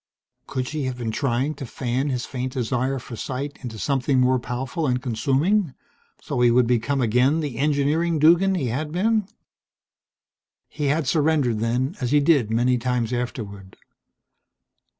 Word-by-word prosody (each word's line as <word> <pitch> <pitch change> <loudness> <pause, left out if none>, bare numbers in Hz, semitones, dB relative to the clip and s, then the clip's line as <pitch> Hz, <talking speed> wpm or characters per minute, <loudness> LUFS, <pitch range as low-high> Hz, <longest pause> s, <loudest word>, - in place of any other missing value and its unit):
Could 130 -1 -3
she 150 -2 -3
have 130 -1 -3
been 115 -2 -3
trying 135 +3 0
to 140 - -7
fan 130 +4 -2
his 125 -2 -2
faint 130 -1 -4
desire 130 +1 -1
for 120 -1 -8
sight 135 +5 -5
into 115 -4 -7
something 135 +2 +1
more 125 0 +3
powerful 130 +7 -3
and 125 -1 +1
consuming 135 - 0 0.5
so 125 - -2
he 120 - +6
would 125 +1 +4
become 125 +4 +1
again 125 +6 +3
the 145 -6 -4
engineering 150 +3 +1
Duggan 175 +5 +4
he 160 -8 -1
had 150 +6 -3
been? 210 +3 +1 1.4
He 150 - -4
had 150 +2 +1
surrendered 145 -5 +1
then, 125 - -1
as 125 - 0
he 145 +2 +4
did 140 -7 +3
many 120 +2 +2
times 125 -1 -1
afterward. 100 -6 -5
130 Hz, 155 wpm, -23 LUFS, 125-150 Hz, 1.4 s, he